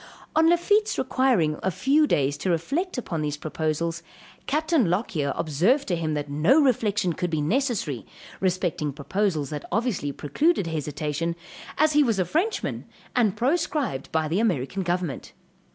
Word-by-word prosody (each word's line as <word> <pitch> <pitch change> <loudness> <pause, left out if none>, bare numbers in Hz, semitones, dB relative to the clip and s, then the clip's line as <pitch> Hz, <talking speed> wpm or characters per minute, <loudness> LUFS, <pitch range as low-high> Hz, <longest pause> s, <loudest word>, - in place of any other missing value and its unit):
On 320 +1 +5
Lafitte's 410 +5 +2
requiring 250 - +1
a 190 - +1
few 285 - +3
days 140 - +1
to 185 - -2
reflect 280 - -1
upon 170 -10 -3
these 150 -1 -2
proposals, 160 +2 -2 0.5
Capt. 310 +3 -1
Lockyer 180 - +1
observed 185 - +1
to 175 - +2
him 160 -2 -2
that 145 0 -3
no 150 - +3
reflection 210 - +2
could 175 +2 -2
be 160 -2 -1
necessary, 190 - -1 0.4
respecting 175 -5 -1
proposals 155 0 -1
that 150 -1 -4
obviously 210 - 0
precluded 240 - +1
hesitation, 155 +1 -2 0.4
as 310 0 +3
he 295 - +5
was 230 -7 +2
a 185 - +1
Frenchman 345 - -1 0.3
and 220 -6 +2
proscribed 275 - -1
by 160 -1 +1
the 170 +6 0
American 190 - 0
government. 175 -6 -3
180 Hz, 150 wpm, -25 LUFS, -, 0.5 s, On